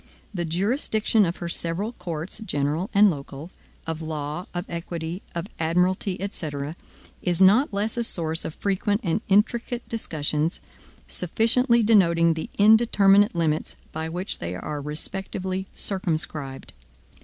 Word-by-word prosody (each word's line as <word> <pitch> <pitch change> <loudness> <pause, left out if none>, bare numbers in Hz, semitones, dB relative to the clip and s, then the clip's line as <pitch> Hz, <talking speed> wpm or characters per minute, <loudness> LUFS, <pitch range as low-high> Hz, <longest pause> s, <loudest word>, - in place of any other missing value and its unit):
The 175 -3 -2
jurisdiction 210 - +1
of 170 - -3
her 170 - -5
several 170 +6 -1
courts, 170 -5 -5
general 155 0 -1
and 205 -1 +6
local, 145 +2 -8 0.3
of 160 0 -4
law, 155 +2 -4
of 175 +1 -4
equity, 170 +1 -5
of 170 - -2
admiralty, 180 +3 +1
etc., 155 -6 -4 0.5
is 175 -2 0
not 205 +9 +5
less 210 +3 -1
a 235 - +1
source 165 -6 +1
of 160 - -6
frequent 205 +1 0
and 175 +2 0
intricate 235 +4 +1
discussions, 155 -6 -1 0.5
sufficiently 230 +6 +2
denoting 170 -6 +4
the 160 - -5
indeterminate 205 -2 +5
limits 160 -2 0 0.2
by 160 +1 -4
which 180 +4 -2
they 85 +1 -4
are 145 +10 -5
respectively 190 +5 -4
circumscribed. 155 -7 -1
175 Hz, 130 wpm, -25 LUFS, 160-205 Hz, 0.5 s, and